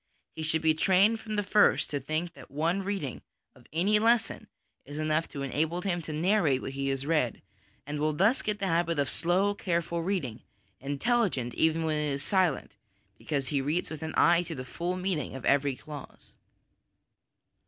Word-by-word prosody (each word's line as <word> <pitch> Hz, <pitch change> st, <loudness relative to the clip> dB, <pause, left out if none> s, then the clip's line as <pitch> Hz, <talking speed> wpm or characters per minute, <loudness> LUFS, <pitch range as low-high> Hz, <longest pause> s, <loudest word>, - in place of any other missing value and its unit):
He -, -, -5 dB
should 160 Hz, 0 st, 0 dB
be 160 Hz, -1 st, +5 dB
trained 195 Hz, +7 st, +3 dB
from 215 Hz, -1 st, -5 dB
the 205 Hz, -, +1 dB
first 210 Hz, +1 st, +3 dB
to 145 Hz, -, -1 dB
think 155 Hz, +5 st, -3 dB
that -, -, -14 dB
one 165 Hz, +7 st, 0 dB
reading 190 Hz, -9 st, -3 dB, 0.3 s
of 125 Hz, -2 st, -20 dB
any 195 Hz, +6 st, +3 dB
lesson 230 Hz, +1 st, +2 dB, 0.4 s
is 145 Hz, +2 st, -9 dB
enough 155 Hz, +1 st, 0 dB
to 140 Hz, -2 st, -6 dB
enable 160 Hz, +6 st, -1 dB
him 175 Hz, -3 st, -1 dB
to 155 Hz, -, -7 dB
narrate 160 Hz, -3 st, +2 dB
what -, -, -4 dB
he 135 Hz, 0 st, -3 dB
has 135 Hz, 0 st, -1 dB
read, 150 Hz, -7 st, 0 dB, 0.4 s
and 145 Hz, +1 st, -4 dB
will 155 Hz, +1 st, +2 dB
thus 195 Hz, -, +3 dB
get 210 Hz, -1 st, -2 dB
the 200 Hz, -, -2 dB
habit 170 Hz, -2 st, +1 dB
of 140 Hz, -1 st, 0 dB
slow, 185 Hz, +4 st, +1 dB
careful 170 Hz, -3 st, -1 dB
reading, 165 Hz, -, -2 dB, 0.4 s
intelligent 145 Hz, -, 0 dB
even 160 Hz, 0 st, +2 dB
when 155 Hz, -1 st, 0 dB
it 150 Hz, -1 st, -1 dB
is 140 Hz, +1 st, 0 dB
silent, 185 Hz, -8 st, +1 dB, 0.5 s
because 140 Hz, -4 st, -2 dB
he 140 Hz, -3 st, +1 dB
reads 155 Hz, +6 st, -1 dB
with 155 Hz, -, -6 dB
an 160 Hz, 0 st, -4 dB
eye 170 Hz, 0 st, +5 dB
to 170 Hz, -2 st, -6 dB
the 130 Hz, -2 st, -6 dB
full 175 Hz, +6 st, -3 dB
meaning 180 Hz, -8 st, -2 dB
of 130 Hz, -, -7 dB
every 140 Hz, -1 st, +3 dB
clause. 145 Hz, +1 st, -11 dB
160 Hz, 185 wpm, -29 LUFS, 145-185 Hz, 0.5 s, be